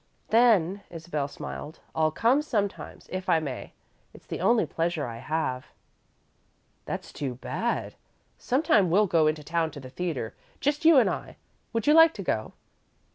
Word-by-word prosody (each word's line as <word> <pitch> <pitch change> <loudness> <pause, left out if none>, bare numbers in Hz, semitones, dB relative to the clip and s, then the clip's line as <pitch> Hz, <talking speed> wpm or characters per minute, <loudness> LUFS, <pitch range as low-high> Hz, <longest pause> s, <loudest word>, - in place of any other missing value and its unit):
"Then," 205 -5 +4
Isabel 160 -4 -4
smiled, 145 +1 -8
"I'll 155 0 +2
come 235 - +2
sometimes, 210 -9 -3
if 185 0 -4
I 165 - +5
may. 140 -5 -6 0.4
It's - - -15
the - - -5
only 235 -1 +3
pleasure 165 -3 -1
I 115 -1 -6
have." 130 -2 -2 1.2
"That's - - -6
too 135 -4 -4
bad. 230 - -3 0.4
Sometime 240 - +2
we'll 205 +5 +4
go 165 -4 +3
into 155 0 -1
town 165 +1 0
to - - -6
the 130 -2 -10
theatre, 145 -7 -3 0.3
just 295 +3 -1
you 325 -2 +8
and 255 - +6
I. - - -4 0.3
Would 230 -1 -2
you 300 - +5
like 325 0 +7
to 200 - -5
go?" 110 -10 -2
170 Hz, 160 wpm, -27 LUFS, 150-230 Hz, 1.2 s, you